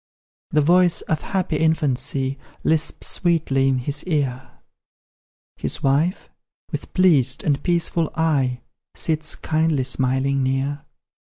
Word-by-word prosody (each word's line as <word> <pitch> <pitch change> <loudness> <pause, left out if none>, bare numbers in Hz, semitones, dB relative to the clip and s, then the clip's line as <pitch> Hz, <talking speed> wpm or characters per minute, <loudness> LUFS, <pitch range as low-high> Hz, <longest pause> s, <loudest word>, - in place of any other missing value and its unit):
The 150 - +2
voice 175 +2 +4
of 155 -1 -2
happy 185 -5 -1
infancy 140 -4 0 0.2
Lisps 160 0 0
sweetly 155 -6 +1
in 135 -1 +2
his 140 +4 -3
ear, 135 -7 -2 1.0
His - - -4
wife, 145 +7 +1 0.4
with - - -5
pleased 145 -8 +4
and 145 -3 +1
peaceful 170 -2 0
eye, 135 -6 +1 0.3
Sits, 155 -1 -1
kindly 155 -3 0
smiling, 130 +1 0
near. 135 +2 -1
145 Hz, 110 wpm, -22 LUFS, 135-160 Hz, 1.0 s, voice